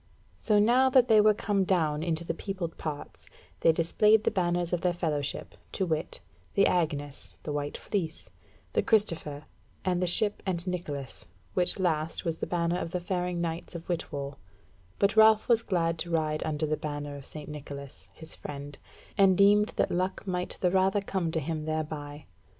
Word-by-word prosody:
So 210 -2 +2
now 245 +5 +5
that 255 -1 +5
they 215 -1 +7
were 215 0 +5
come 200 -1 +1
down 160 -5 +1
into 165 0 -1
the 165 - -1
peopled 180 -2 -5
parts, 150 -2 -6 0.3
they 165 - +5
displayed 210 +7 +3
the - - +2
banners 175 -2 0
of 175 - 0
their 180 -1 +1
fellowships, 150 -5 -2 0.2
to 190 - 0
wit, 160 0 -2 0.3
the 200 - +5
Agnes, 145 -5 -1
the 150 - -4
White 145 0 -3
Fleece, 170 -6 -4 0.4
the - - +3
Christopher, 165 -9 +1 0.4
and 180 -1 +1
the 180 - +1
Ship 205 +4 +2
and 175 -2 -2
Nicholas, 145 - -5 0.3
which 180 -1 +1
last 160 -2 -1
was 165 -1 -1
the - - -3
banner 170 0 0
of - - -3
the 180 +1 -2
Faring 180 -1 -2
knights 170 +1 -4
of 170 0 -7
Whitwall; 145 -5 -3 0.6
but 200 +1 +2
Ralph 220 0 +6
was 230 -2 +4
glad 165 -5 0
to 170 - -4
ride 155 -2 0
under 155 0 -1
the 155 0 -1
banner 145 -1 -5
of 140 - -9
St. 150 -1 -9
Nicholas, 140 -2 -8
his 160 0 -7
friend, 145 0 -8 0.4
and 190 -2 +6
deemed 205 +1 +5
that - - +1
luck 185 +2 -1
might 180 -2 -3
the 180 - +3
rather 190 +2 +3
come 190 -4 -2
to 160 - 0
him 155 0 -3
thereby. 150 -2 -4
170 Hz, 180 wpm, -29 LUFS, 155-190 Hz, 0.6 s, they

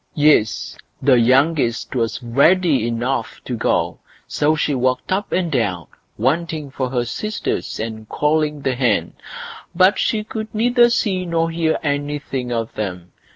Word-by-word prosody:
Yes! 145 -8 +2 0.2
the 130 -4 +4
youngest 130 +1 +2
was 120 0 -2
ready 140 +1 +3
enough 120 0 -2
to 125 - -3
go; - - 0 0.3
so 150 +2 +1
she 150 -1 0
walked 130 +2 -1
up 195 +2 -1
and 175 -2 0
down, 100 - -1 0.3
Wanting 155 +4 -1
for 130 -1 -2
her 125 -1 -1
sisters 215 - -3
and 110 -1 -6
calling 150 0 0
the 130 - +1
hen, 125 -1 0 0.6
but 185 +3 +4
she 215 -2 0
could 220 0 -6
neither 240 +2 +4
see 200 -6 0
nor 165 0 0
hear 165 -1 0
anything 145 -3 -2
of 115 -1 -2
them. 90 -4 -5
145 Hz, 145 wpm, -20 LUFS, 120-165 Hz, 0.6 s, the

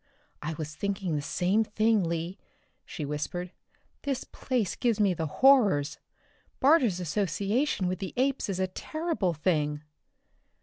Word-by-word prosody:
"I 155 +2 -3
was 150 0 -5
thinking 195 0 -2
of - - +1
the - - -1
same 190 +8 +1
thing, 215 -1 +2
Lee," 170 +2 -3 0.5
she 150 - -5
whispered. 165 +5 -4 0.5
"This 275 -3 -2
place 220 -11 -2
gives 230 +1 +1
me 200 -3 +4
the 160 -2 -2
horrors. 205 - +4 0.6
Barter's 260 - +4
association 200 - 0
with 180 0 -2
the 190 - -5
apes 270 -2 +1
is 190 -2 -2
a 190 - +2
terrible 300 - -2
thing." 150 -2 0
190 Hz, 140 wpm, -28 LUFS, 165-225 Hz, 0.6 s, me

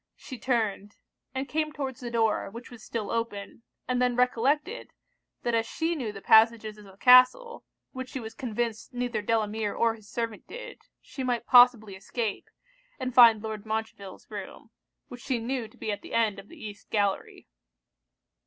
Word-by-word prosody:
She 255 -4 -10
turned; 215 -5 -1 0.4
and 265 +1 -2
came 305 0 -1
towards 270 -4 -5
the 245 - -5
door, 225 -2 +1
which 235 +5 -10
was 235 -3 -12
still 220 -3 -4
open, 230 -2 -4 0.3
and 250 0 0
then 250 -1 +2
recollected, 265 - +1 0.5
that 240 - 0
as 225 0 +1
she 330 +1 -1
knew 250 -10 -3
the 200 -1 -11
passages 220 -1 +4
of 210 - -14
the 195 -1 -16
castle, 255 - +5 0.3
which 260 -1 -7
she 265 - -5
was 220 -2 -8
convinced 235 0 -4
neither 245 -3 -2
Delamere 215 -1 -1
or 230 -1 +2
his 215 -2 -15
servant 230 -3 -4
did, - - -9 0.2
she 265 - -7
might 240 -2 -1
possibly 245 -5 +6
escape, 210 +2 -4 0.5
and 255 -1 -3
find 230 -3 +7
Lord 215 -2 -5
Montreville's 220 -3 -5
room, 205 +2 -8 0.4
which 245 -1 -10
she 270 -2 -1
knew 235 0 -3
to 215 - -22
be 215 - -3
at 205 - -4
the - - -7
end 220 -3 +1
of 195 - -12
the - - -14
East 205 -1 -10
gallery. 200 -2 -1
230 Hz, 175 wpm, -27 LUFS, 215-250 Hz, 0.5 s, find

